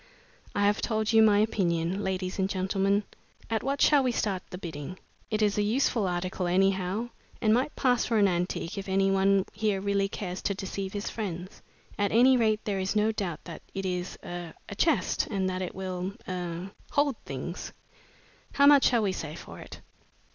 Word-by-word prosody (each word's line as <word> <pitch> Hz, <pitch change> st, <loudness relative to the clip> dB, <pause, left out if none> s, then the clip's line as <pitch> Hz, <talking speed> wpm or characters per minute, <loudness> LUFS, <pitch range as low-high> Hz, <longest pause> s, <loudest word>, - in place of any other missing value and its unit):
I 205 Hz, -, +2 dB
have 205 Hz, +1 st, +2 dB
told 220 Hz, -1 st, 0 dB
you 225 Hz, -, +7 dB
my 215 Hz, -2 st, +6 dB
opinion, 190 Hz, -3 st, +1 dB
ladies 185 Hz, 0 st, -2 dB
and 190 Hz, 0 st, +1 dB
gentlemen. 195 Hz, +2 st, +1 dB, 0.5 s
At 225 Hz, -, +1 dB
what 275 Hz, +2 st, 0 dB
shall 290 Hz, -2 st, +6 dB
we 255 Hz, -2 st, +1 dB
start 200 Hz, -5 st, -1 dB
the 180 Hz, -, -6 dB
bidding? 165 Hz, -1 st, -6 dB, 0.3 s
It 215 Hz, -1 st, +1 dB
is 210 Hz, 0 st, +2 dB
a -, -, +4 dB
useful 220 Hz, -1 st, +1 dB
article, 180 Hz, +1 st, -2 dB
anyhow, 190 Hz, +4 st, +1 dB, 0.3 s
and 215 Hz, -2 st, +3 dB
might 260 Hz, +5 st, +1 dB
pass 250 Hz, -3 st, +2 dB
for 230 Hz, -, +1 dB
an 205 Hz, -1 st, +5 dB
antique 180 Hz, +1 st, -2 dB
if 195 Hz, -, -7 dB
any 195 Hz, 0 st, +3 dB
one 195 Hz, 0 st, +3 dB
here 210 Hz, -2 st, 0 dB
really 200 Hz, 0 st, 0 dB
cares 185 Hz, -2 st, -5 dB
to 200 Hz, -, -1 dB
deceive 195 Hz, 0 st, -4 dB
his 205 Hz, 0 st, -3 dB
friends. 185 Hz, -4 st, -5 dB, 0.4 s
At 200 Hz, -1 st, +1 dB
any 250 Hz, +4 st, +6 dB
rate, 220 Hz, -3 st, +2 dB
there 200 Hz, -2 st, -1 dB
is 190 Hz, +2 st, -1 dB
no 215 Hz, +1 st, +3 dB
doubt 190 Hz, -7 st, -4 dB
that 170 Hz, -, -9 dB
it 195 Hz, 0 st, -3 dB
is 180 Hz, 0 st, -3 dB
er 175 Hz, -2 st, -6 dB
a -, -, -6 dB
chest, 260 Hz, -, +1 dB
and 195 Hz, -3 st, -1 dB
that 185 Hz, 0 st, -3 dB
it 180 Hz, -, -4 dB
will 185 Hz, 0 st, -4 dB
er 180 Hz, 0 st, -4 dB, 0.2 s
hold 285 Hz, -3 st, +2 dB
things. 140 Hz, +6 st, -6 dB, 0.8 s
How 280 Hz, -, +5 dB
much 285 Hz, -1 st, +7 dB
shall 235 Hz, -3 st, +3 dB
we 200 Hz, -, +1 dB
say 155 Hz, -4 st, -5 dB
for -, -, -10 dB
it?" -, -, -10 dB
195 Hz, 190 wpm, -28 LUFS, 185-215 Hz, 0.8 s, you